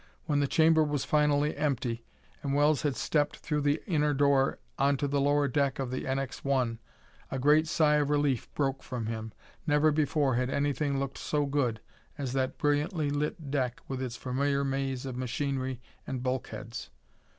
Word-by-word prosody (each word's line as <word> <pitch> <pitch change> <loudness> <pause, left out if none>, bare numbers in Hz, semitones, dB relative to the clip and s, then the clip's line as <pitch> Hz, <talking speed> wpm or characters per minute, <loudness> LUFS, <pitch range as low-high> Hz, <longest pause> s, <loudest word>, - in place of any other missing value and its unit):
When 145 -3 +1
the 140 - +2
chamber 160 +1 +4
was 145 -3 -1
finally 150 0 +2
empty, 130 -5 -1 0.4
and 140 -1 -1
Wells 145 0 +3
had 145 -3 0
stepped 145 -2 0
through 150 -1 -2
the 145 +2 +1
inner 150 -5 +1
door 140 -1 +3 0.2
onto 140 0 +2
the 140 0 +1
lower 145 0 +3
deck 140 0 +1
of 130 -2 -3
the 130 - -3
NX 135 0 -3
1, 125 -5 0 0.5
a 135 - -3
great 150 +4 +4
sigh 150 -1 +3
of 145 -1 +1
relief 145 -4 +1
broke 135 -2 0
from 120 -3 -4
him. 110 0 -4 0.4
Never 150 +1 +4
before 150 -2 +2
had 125 0 0
anything 140 0 0
looked 135 0 -4
so 150 -1 0
good 130 -6 0 0.4
as 135 -4 -3
that 130 -1 -1
brilliantly 150 +1 +1
lit 145 0 -2
deck 130 -4 -1
with 130 -1 -4
its 125 -2 -3
familiar 140 +2 0
maze 135 -1 -2
of 130 -2 -4
machinery 130 0 -2 0.3
and 130 -2 -3
bulkheads. 120 -3 -4
140 Hz, 175 wpm, -29 LUFS, 130-145 Hz, 0.5 s, chamber